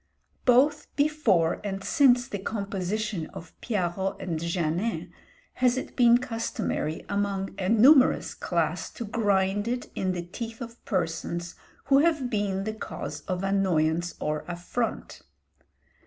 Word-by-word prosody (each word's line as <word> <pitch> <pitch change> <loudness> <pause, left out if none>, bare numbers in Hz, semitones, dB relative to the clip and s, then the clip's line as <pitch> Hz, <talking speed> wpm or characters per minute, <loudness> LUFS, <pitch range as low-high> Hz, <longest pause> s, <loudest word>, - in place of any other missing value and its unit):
Both 275 +4 +4
before 250 - +2
and 195 -1 -4
since 245 -4 +4
the 205 - -4
composition 200 -2 -3
of 165 - -9
'Piarot 190 -3 -1
and 165 -3 -3
Janin,' 170 +5 -1 0.5
has 250 0 +4
it - - -5
been 240 -1 +6
customary 225 -9 -3
among 200 -1 -1
a 185 -1 -1
numerous 255 +5 +5
class - - -1
to 235 - -5
grind 205 -1 +1
it 245 +1 -3
in 185 -1 -1
the 175 -1 -3
teeth 225 +6 -7
of 235 -1 -9
persons 170 -2 -2 0.3
who 275 0 +5
have 300 -5 +2
been 200 -3 0
the 215 +1 -3
cause 215 - -6
of 185 -1 -2
annoyance 175 -4 +1
or 150 0 -2
affront. 180 +7 -4
200 Hz, 130 wpm, -27 LUFS, 180-240 Hz, 0.5 s, been